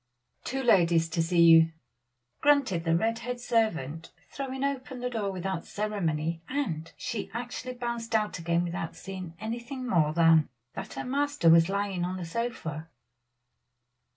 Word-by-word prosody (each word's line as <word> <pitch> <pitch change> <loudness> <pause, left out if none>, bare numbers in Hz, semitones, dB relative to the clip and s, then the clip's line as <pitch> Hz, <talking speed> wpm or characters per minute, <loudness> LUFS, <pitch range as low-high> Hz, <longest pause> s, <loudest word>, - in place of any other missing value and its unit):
"Two 270 +1 -3
ladies 170 -8 +4
to 165 0 0
see 170 +1 +3
you," 165 0 +7 0.7
grunted 275 - +3
the 165 0 +3
red 225 +4 0
haired 245 0 -4
servant, 165 - -1 0.2
throwing 265 -1 -4
open 265 -2 -3
the 250 0 -3
door 210 -4 -1
without 190 -1 -3
ceremony; 165 -6 -2
and 170 - -2
she 225 - -4
actually 245 +1 -5
bounced 235 -2 -3
out 210 -4 0
again 170 +1 +1
without 170 -1 -4
seeing 185 -3 -7
anything 235 +4 -5
more 160 -8 +3
than 165 -1 +5 0.2
that 195 +2 -7
her - - -4
master 280 - +2
was 165 +1 +6
lying 200 -2 -1
on 180 +1 -2
the 180 - -5
sofa. 165 -6 -4
195 Hz, 150 wpm, -28 LUFS, 165-245 Hz, 0.7 s, you